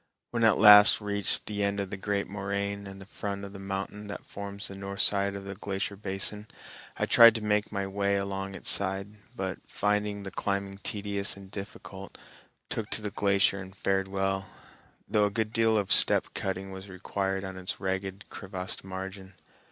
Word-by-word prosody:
When 115 -1 0
I - - +7
at 110 - +4
last 105 0 +9
reached 100 -1 0
the 105 -1 -3
end 100 0 0
of 100 -2 -4
the - - -3
great 100 0 -2
moraine 100 0 -3
and 95 0 -9
the 95 - -10
front 100 0 -5
of 100 - -10
the 100 - -9
mountain 100 +2 -5
that 100 - -7
forms 100 0 -7
the - - -9
north 100 +1 -4
side 100 -1 +2
of 100 0 -7
the 100 - -5
glacier 100 0 -4
basin, 100 +1 +1 0.5
I - - +1
tried 115 -1 +8
to 115 - -3
make 105 0 +1
my 100 -2 -2
way 100 +1 0
along 100 0 -4
its - - +2
side, 95 0 +2 0.3
but, 95 -1 -4
finding 105 0 -1
the 95 - -7
climbing 100 0 -3
tedious 100 -1 -1
and 95 -1 -13
difficult, 100 -1 -8 0.5
took 110 -2 -4
to 110 - -2
the 105 - -3
glacier 100 -1 +2
and 95 0 -10
fared 95 0 0
well, 95 0 -1 0.6
though 105 -1 +3
a - - +1
good 110 +1 -2
deal 115 -1 +3
of 100 -2 -1
step - - +6
cutting 95 0 -4
was 95 +1 -9
required 95 +1 -3
on 95 0 -6
its 95 -1 -5
ragged, 95 0 -3
crevassed 95 -2 -6
margin. 95 0 -7
100 Hz, 190 wpm, -28 LUFS, 95-100 Hz, 0.6 s, last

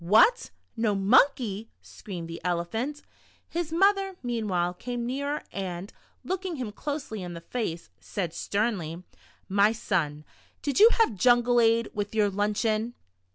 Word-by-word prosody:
"What, 225 - +5 0.3
no 225 -3 +1
monkey?" 220 +1 +3
screamed 175 -5 -8
the 165 0 -7
Elephant. 200 - -2 0.4
His 340 -2 -3
mother, 390 +2 +3
meanwhile, 205 -8 -1
came 240 +5 -4
nearer, 280 +4 -2
and 185 -1 -5 0.3
looking 375 -2 -3
him 250 -7 -4
closely 270 -3 -4
in 175 -1 -6
the 170 - -8
face, 170 -4 -4
said 175 -5 -4
sternly: 185 -5 -2 0.2
" - - -32
My 210 +2 +6
son, 155 -9 -1 0.4
did 285 +3 0
you 440 +3 +10
have 450 - +3
jungle 240 +4 +4
ade 230 0 +3
with 205 +1 -3
your 210 -2 +3
lunch 205 +3 0
eon?" 220 +2 0
220 Hz, 145 wpm, -27 LUFS, 185-255 Hz, 0.4 s, you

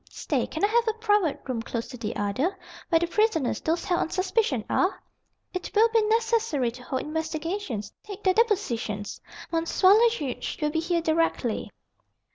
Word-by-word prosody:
Stay, - - -2
can - - -5
I - - +3
have 470 +2 +2
a 445 - +2
private 415 -8 +1
room 250 -4 -2
close 230 0 -4
to 250 - -8
the 225 -1 -4
other 255 - -1 0.3
where 330 - +5
the 340 - +1
prisoners, 345 - +1
those 330 +2 -1
held 350 - +1
on - - -1
suspicion, 370 - 0
are? 370 +2 +1 0.5
It 365 -1 -4
will 445 +2 +6
be 455 0 +3
necessary 450 - +1
to 250 +2 -12
hold 260 +1 -3
investigations, 320 - -3
take 410 -1 -9
their 375 - +4
depositions. 245 - 0 0.3
M. 330 0 +2 0.2
le 425 +5 +7
Juge 270 - -4
will 300 -1 0
be 320 - 0
here 335 +1 0
directly." 315 -8 0
330 Hz, 175 wpm, -26 LUFS, 255-415 Hz, 0.5 s, le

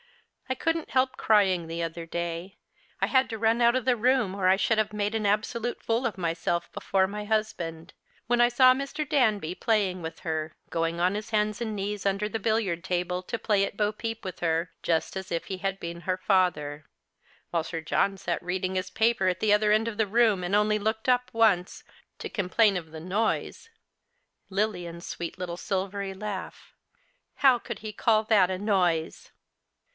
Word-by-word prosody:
I 260 - 0
couldn't 330 +3 -1
help 260 0 +1
crying 190 -6 +3
the 165 +1 -4
other 165 0 -5
day 170 +2 -4 0.2
— - - -33
I - - +4
had 260 -1 +2
to 225 - -4
run 225 +2 +2
out 235 +1 +5
of 255 - -1
the 255 -1 +3
room, 240 -3 +2
or 185 -2 +2
I 190 - +5
should 220 +2 +2
have 215 0 0
made 210 +1 -1
an 215 -1 -1
absolute 220 +3 -1
fool 230 +3 0
of 220 - -6
myself 170 0 -1
Ijefore 190 -1 +1
my 210 +2 -5
husband 185 -7 -2 0.2
— - - -35
when 240 0 +3
I 240 - +6
saw 255 +1 +6
Mr. 275 +3 -4
Danby 215 - +2
playing 195 -5 0
with 160 0 -7
her, 160 -1 -3 0.2
"•oino 165 0 -1
on 180 +2 +2
his 215 +1 -5
hands 215 0 0
and 220 -2 -2
knees 200 0 -3
under 200 +1 +1
the 220 +1 -3
l)illiard 210 -6 0
table 180 -1 -1
to 230 +5 -4
play 205 -3 +2
at 200 - -3
bo 210 0 +1
peep 225 0 -5
with 185 -1 -6
her, 165 0 0
just 165 +2 0
as 190 0 -6
if 170 -1 -2
he 190 -1 -5
had 195 0 -2
been 170 0 -6
her 185 +1 -1
father; 155 -7 +1 0.7
while 170 -2 0
Sir 165 0 -4
John 195 +4 0
sat 175 -3 -2
reading 185 +1 -2
his 185 0 -2
paper 220 -4 +2
at 180 - +1
the 215 -1 +3
other 210 0 +3
end 215 +2 +3
of 220 -2 -4
the 220 -2 +2
room, 215 -3 +3
and 180 +3 0
only 210 0 +3
looked 220 +2 -2
up 250 0 +2
once, 210 -6 +2 0.3
to - - -5
complain 200 +1 +2
of 165 -3 -5
the 160 - -8
noise 210 - -2 0.4
— 485 0 -48
Lilian's 180 -4 -2
sweet 170 +1 -5
little 175 -1 -5
silvery 195 +1 -3
laugh! 200 -1 -6 0.7
Plow 260 -3 +5
could - - -7
he 215 0 -7
call 220 0 +2
that 210 -4 +4
a 185 - -2
noise 180 -5 0
200 Hz, 200 wpm, -27 LUFS, 180-220 Hz, 0.7 s, I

